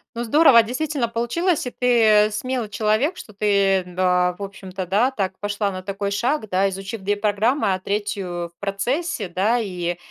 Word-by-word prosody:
Ну, 235 Hz, -, -2 dB
здорово, 250 Hz, -1 st, +6 dB
действительно 265 Hz, +2 st, -2 dB
получилось. 260 Hz, +10 st, 0 dB
И -, -, -4 dB
ты 220 Hz, -4 st, +4 dB
смелый 245 Hz, +1 st, -3 dB
человек, 220 Hz, -, 0 dB
что 215 Hz, -, -11 dB
ты, 195 Hz, -2 st, +2 dB
да, 180 Hz, 0 st, +1 dB
в -, -, -10 dB
общем-то, 190 Hz, -1 st, -7 dB
да, 210 Hz, +9 st, +2 dB
так 190 Hz, -6 st, -3 dB
пошла 205 Hz, 0 st, -2 dB
на 185 Hz, -1 st, -6 dB
такой 200 Hz, +1 st, -3 dB
шаг, 235 Hz, +1 st, -1 dB
да, 190 Hz, +2 st, +2 dB
изучив 195 Hz, +3 st, -6 dB
2 205 Hz, +2 st, 0 dB
программы, 215 Hz, +1 st, +1 dB
а 185 Hz, -, -2 dB
3 195 Hz, -4 st, -3 dB
в -, -, -72 dB
процессе, 210 Hz, -, -2 dB
да. 200 Hz, +7 st, +1 dB
И, 175 Hz, -5 st, -3 dB
205 Hz, 170 wpm, -22 LUFS, 190-235 Hz, -, здорово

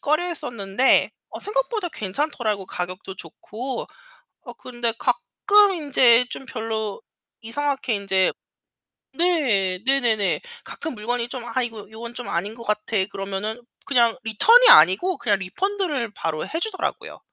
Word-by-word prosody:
꺼려했었는데 265 Hz, -, +1 dB, 0.2 s
어 -, -, -8 dB
생각보다 430 Hz, -3 st, -2 dB
괜찮더라고요 215 Hz, -2 st, -2 dB
가격도 185 Hz, +2 st, -6 dB
좋고. 225 Hz, -, -7 dB, 0.6 s
어 -, -, -8 dB
근데 240 Hz, -2 st, -4 dB
가끔 405 Hz, -1 st, +3 dB
인제 255 Hz, -6 st, +4 dB
좀 270 Hz, -, -7 dB
별로 220 Hz, -4 st, -4 dB, 0.4 s
이상하게 265 Hz, 0 st, -1 dB
인제 195 Hz, -2 st, +1 dB, 0.9 s
네. 235 Hz, -, +1 dB
네네네. 235 Hz, -8 st, +1 dB, 0.2 s
가끔 320 Hz, -5 st, -6 dB
물건이 235 Hz, +2 st, -3 dB
좀 250 Hz, -1 st, -5 dB
'아 240 Hz, +2 st, -1 dB
이건 225 Hz, -4 st, -6 dB
요건 230 Hz, +2 st, -9 dB
좀 245 Hz, -, -6 dB
아닌 195 Hz, +6 st, -2 dB
것 230 Hz, -, -11 dB
같아.' 210 Hz, -2 st, 0 dB
그러면은 195 Hz, +4 st, -4 dB, 0.3 s
그냥 235 Hz, -4 st, +3 dB
리턴이 455 Hz, -, +6 dB
아니고 365 Hz, -, +6 dB
그냥 210 Hz, -4 st, +1 dB
리펀드를 300 Hz, -, -2 dB
바로 155 Hz, -1 st, -3 dB
해 325 Hz, -, -4 dB
주더라고요. 405 Hz, -1 st, -4 dB
235 Hz, 295 characters per minute, -23 LUFS, 205-290 Hz, 0.9 s, 리턴이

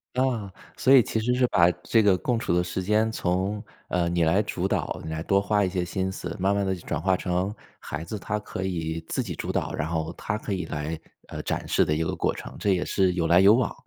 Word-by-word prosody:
啊， 120 Hz, -7 st, 0 dB, 0.2 s
所 135 Hz, -, +2 dB
以 130 Hz, -4 st, +8 dB
其 110 Hz, -, -2 dB
实 125 Hz, +3 st, +1 dB
是 125 Hz, 0 st, +3 dB
把 85 Hz, -4 st, +5 dB
这 115 Hz, -, +3 dB
个 100 Hz, -3 st, +4 dB
共 120 Hz, +2 st, 0 dB
处 -, -, -2 dB
的 90 Hz, 0 st, +3 dB
时 90 Hz, +1 st, -3 dB
间， 110 Hz, +3 st, +2 dB
从， 95 Hz, +2 st, -1 dB, 0.3 s
嗯， 85 Hz, -1 st, 0 dB
你 85 Hz, -1 st, +2 dB
来 85 Hz, +6 st, +3 dB
主 95 Hz, -3 st, -2 dB
导， -, -, -1 dB
你 80 Hz, -, -5 dB
来 80 Hz, 0 st, -3 dB
多 100 Hz, +3 st, +2 dB
花 105 Hz, +1 st, +1 dB
一 95 Hz, -, +1 dB
些 90 Hz, -1 st, -1 dB
心 95 Hz, +1 st, -2 dB
思， 90 Hz, -2 st, -6 dB
慢 100 Hz, +2 st, +2 dB
慢 100 Hz, -1 st, +1 dB
地 95 Hz, -, 0 dB
就 85 Hz, -, -11 dB
转 -, -, -1 dB
化 95 Hz, +2 st, +2 dB
成， 90 Hz, +3 st, -1 dB, 0.3 s
孩 80 Hz, +1 st, -5 dB
子 105 Hz, +6 st, -5 dB
她 105 Hz, +2 st, -3 dB
可 95 Hz, -2 st, -6 dB
以 80 Hz, -3 st, -2 dB
自 130 Hz, -, -1 dB
己 95 Hz, -8 st, -5 dB
主 -, -, -3 dB
导， -, -, -1 dB
然 80 Hz, -, -2 dB
后 80 Hz, 0 st, -2 dB
她 100 Hz, -, -3 dB
可 105 Hz, 0 st, -5 dB
以 95 Hz, -2 st, -1 dB
来， 75 Hz, +2 st, -4 dB, 0.3 s
呃， -, -, -6 dB
展 -, -, -3 dB
示 -, -, +3 dB
的 75 Hz, -, 0 dB
一 80 Hz, -, 0 dB
个 -, -, -2 dB
过 -, -, 0 dB
程， -, -, -9 dB
这 100 Hz, -, +2 dB
也 90 Hz, -1 st, 0 dB
是 95 Hz, -2 st, +2 dB
有 85 Hz, -2 st, 0 dB
来 85 Hz, +2 st, +6 dB
有 100 Hz, +2 st, +7 dB
往。 120 Hz, 0 st, +1 dB
95 Hz, 280 characters per minute, -26 LUFS, 85-105 Hz, 0.3 s, 以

